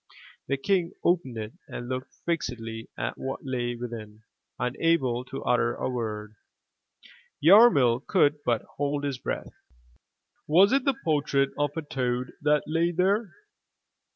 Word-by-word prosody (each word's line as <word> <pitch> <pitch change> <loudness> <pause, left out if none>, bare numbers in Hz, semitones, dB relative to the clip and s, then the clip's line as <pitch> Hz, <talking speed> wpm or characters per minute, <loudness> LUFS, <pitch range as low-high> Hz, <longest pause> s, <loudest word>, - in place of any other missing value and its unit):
The 140 - 0
King 175 +3 0
opened 165 -9 +1
it 110 0 -5
and 120 - -7
looked 130 +1 -5
fixedly 115 -9 -3
at - - -3
what 135 +1 -5
lay 120 -2 -2
within, 110 -3 -8 0.3
unable 125 -1 +1
to 135 - -7
utter 120 0 +2
a - - -3
word. 105 -3 -4 1.1
Yarmil 150 - +6
could 150 -6 +3
but 120 -4 +1
hold 145 0 -1
his 140 -3 -2
breath. - - -4 0.9
Was 185 +6 +6
it 275 -1 +2
the 275 -2 +2
portrait 145 -3 +1
of 145 +1 -1
a 160 - -2
toad 125 -3 -2
that 150 0 +3
lay 165 +2 +1
there? 195 +5 +1
135 Hz, 135 wpm, -27 LUFS, 120-165 Hz, 1.1 s, Yarmil